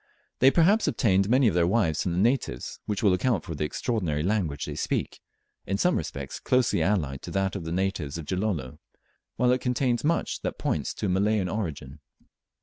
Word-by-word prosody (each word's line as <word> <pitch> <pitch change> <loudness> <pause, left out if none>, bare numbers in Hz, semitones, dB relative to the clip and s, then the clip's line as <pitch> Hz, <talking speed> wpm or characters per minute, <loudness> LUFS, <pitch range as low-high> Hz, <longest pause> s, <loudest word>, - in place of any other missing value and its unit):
They 130 - +7
perhaps 190 +9 +3
obtained 100 -3 +2
many 130 +1 +4
of 105 - +2
their 85 -1 +3
wives 90 -7 +1
from 90 - -1
the - - -2
natives, 110 - 0
which 105 0 -2
will 100 -3 +5
account 95 0 +1
for 80 - -6
the 75 0 -2
extraordinary 80 - -2
language 90 -7 -1
they - - -5
speak - - -2 0.5
in 95 - 0
some 180 - +2
respects 70 -2 -4
closely 125 -1 +2
allied 75 -10 0
to - - -8
that 95 -1 -1
of 80 - -5
the 80 - -4
natives 90 -5 -2
of 80 - -6
Gilolo, 90 -7 -2 0.6
while 125 +1 +3
it 125 0 +1
contains 125 -1 0
much 165 +3 0
that - - -3
points - - -2
to - - -4
a - - 0
Malayan 100 +1 +1
origin. 75 -8 -5
95 Hz, 195 wpm, -26 LUFS, 80-115 Hz, 0.6 s, They